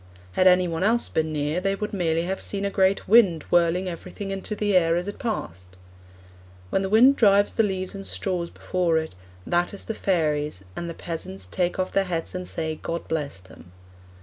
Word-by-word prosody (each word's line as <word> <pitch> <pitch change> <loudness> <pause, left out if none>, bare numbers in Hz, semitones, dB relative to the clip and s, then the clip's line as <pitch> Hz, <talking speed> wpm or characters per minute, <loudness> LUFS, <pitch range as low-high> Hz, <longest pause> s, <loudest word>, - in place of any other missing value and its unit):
'Had 185 - +3
any 180 0 +5
one 165 0 -3
else 230 +4 +2
been 160 0 -1
near 150 +3 -1
they 195 +1 0
would 210 +1 -5
merely 165 -3 0
have 190 +2 -3
seen 200 -1 -1
a 200 - -1
great 190 0 +2
wind 195 -8 +5
whirling 175 +2 +3
everything 185 +3 -6
into 195 +2 -4
the 205 -1 0
air 165 -2 +4
as 175 +2 -2
it 205 - -6
passed.' 90 - -5 1.0
When - - +2
the 190 - -2
wind 250 +7 +6
drives 205 -2 +4
the - - +3
leaves 190 -3 -2
and 195 -1 -7
straws 180 -3 -2
before 175 -3 0
it, 160 0 -3 0.3
'that 175 +3 0
is - - -6
the 225 - -3
fairies, 150 - -1
and 170 - -4
the 165 - -6
peasants 95 - -6
take 180 -1 0
off 185 0 -1
their 195 0 +2
hats 170 -3 -3
and 180 0 -4
say 160 -1 -3
"God 170 0 -4
bless 145 -10 -3
them."' 90 -1 -16
180 Hz, 205 wpm, -25 LUFS, 165-195 Hz, 1.0 s, wind